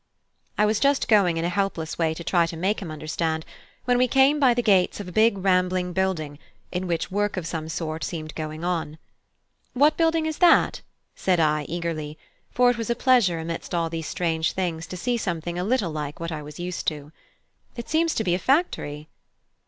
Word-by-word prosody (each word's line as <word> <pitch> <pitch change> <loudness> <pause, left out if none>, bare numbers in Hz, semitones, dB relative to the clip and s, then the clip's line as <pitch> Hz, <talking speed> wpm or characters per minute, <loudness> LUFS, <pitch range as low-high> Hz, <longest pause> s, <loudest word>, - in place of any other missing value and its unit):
I 210 - +4
was 215 0 +1
just 280 0 +2
going 195 -6 +4
in 165 - -1
a - - +1
helpless 180 -4 -2
way 160 -1 +1
to 170 - -7
try 170 0 +2
to 165 - -6
make 195 +6 0
him 180 - -6
understand, 160 +1 -3 0.4
when 245 -1 +2
we 255 - +4
came 270 +4 +4
by 255 -4 +4
the 245 - 0
gates 195 -4 +3
of 205 - -6
a - - -7
big 215 +2 +3
rambling 185 -1 +1
building, 165 -6 -1 0.3
in 185 +1 -3
which 170 0 -2
work 205 +1 -1
of 180 - -3
some 160 -1 -4
sort 160 -1 -4
seemed 155 -4 -5
going 155 0 -6
on. 165 -3 -2 0.8
"What 290 +4 +4
building 325 -1 +2
is 315 -1 -3
that?" 350 -2 +4 0.3
said 185 -2 +1
I, 150 -2 +2
eagerly; 160 -3 -4 0.3
for 245 0 +4
it 240 - -5
was 230 - -3
a 235 - +1
pleasure 240 -9 +3
amidst 165 +2 -5
all 165 -1 0
these 165 -1 -4
strange 160 -2 -1
things 165 -3 -3
to 185 - -7
see 240 +6 -1
something 175 -4 -3
a - - -1
little 210 -5 0
like 150 -1 -5
what 165 0 -4
I 155 -1 -4
was 150 +1 -10
used 175 0 -4
to: 150 -1 -3 0.6
"it 235 -1 -7
seems 325 +1 +1
to 220 - 0
be 175 - +1
a 180 - 0
factory." 180 - 0
180 Hz, 205 wpm, -24 LUFS, 160-220 Hz, 0.8 s, I